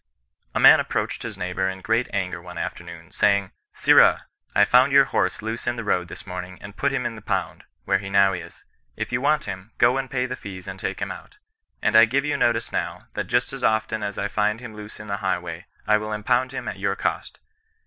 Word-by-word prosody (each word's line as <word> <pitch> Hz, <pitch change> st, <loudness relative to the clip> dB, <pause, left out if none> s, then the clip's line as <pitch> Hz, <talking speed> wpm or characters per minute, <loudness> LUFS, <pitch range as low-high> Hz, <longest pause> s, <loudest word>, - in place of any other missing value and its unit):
'< -, -, -47 dB
A -, -, +2 dB
man -, -, +9 dB
approached -, -, -2 dB
his -, -, -6 dB
neighbour 90 Hz, +1 st, -1 dB
in 95 Hz, 0 st, -7 dB
great 115 Hz, +5 st, +1 dB
anger 90 Hz, -4 st, -2 dB
one 90 Hz, 0 st, -10 dB
afternoon, 85 Hz, 0 st, -7 dB
saying 100 Hz, -2 st, +2 dB
— -, -, -58 dB
Sirrah! -, -, +6 dB, 0.3 s
I 105 Hz, -, +6 dB
found 130 Hz, +5 st, +5 dB
your 140 Hz, 0 st, +7 dB
horse 95 Hz, -7 st, -1 dB
loose 110 Hz, +2 st, -4 dB
in 120 Hz, -, +1 dB
the 115 Hz, -, -5 dB
road 90 Hz, -4 st, 0 dB
this 85 Hz, -, -9 dB
morning, 90 Hz, 0 st, -7 dB
and 100 Hz, 0 st, -11 dB
put 140 Hz, +5 st, 0 dB
him 130 Hz, -3 st, -2 dB
in 120 Hz, -, -2 dB
the 110 Hz, -, -10 dB
pound, 95 Hz, -4 st, -3 dB, 0.2 s
where 95 Hz, -, +2 dB
he 95 Hz, 0 st, -7 dB
now 100 Hz, 0 st, +4 dB
is. 90 Hz, -, -8 dB, 0.3 s
If -, -, -4 dB
you 120 Hz, +1 st, 0 dB
want 150 Hz, +2 st, +2 dB
him, 95 Hz, +3 st, -7 dB
go 125 Hz, +2 st, +4 dB
and 135 Hz, -1 st, -4 dB
pay 125 Hz, -1 st, -1 dB
the 125 Hz, -, -4 dB
fees 95 Hz, -5 st, -9 dB
and 95 Hz, 0 st, -7 dB
take -, -, -4 dB
him -, -, -4 dB
out. 415 Hz, -, -11 dB, 0.5 s
And 110 Hz, 0 st, +2 dB
I 110 Hz, +1 st, +9 dB
give 135 Hz, +5 st, 0 dB
you 150 Hz, -, 0 dB
notice 120 Hz, -, +1 dB
now, -, -, -4 dB
that -, -, -3 dB
just 125 Hz, +1 st, 0 dB
as 135 Hz, -2 st, -7 dB
often 110 Hz, 0 st, +1 dB
as 100 Hz, -1 st, -4 dB
I 100 Hz, -, -1 dB
find 105 Hz, +1 st, 0 dB
him 120 Hz, -3 st, -9 dB
loose 105 Hz, 0 st, -10 dB
in 105 Hz, -, -8 dB
the 100 Hz, -1 st, -3 dB
highway, 90 Hz, -3 st, -3 dB, 0.2 s
I 105 Hz, -, +4 dB
will 110 Hz, 0 st, -4 dB
impound 120 Hz, +4 st, +1 dB
him 135 Hz, -, -6 dB
at 100 Hz, -2 st, -5 dB
your 100 Hz, 0 st, 0 dB
cost. -, -, -3 dB
105 Hz, 240 wpm, -24 LUFS, 95-120 Hz, 0.5 s, man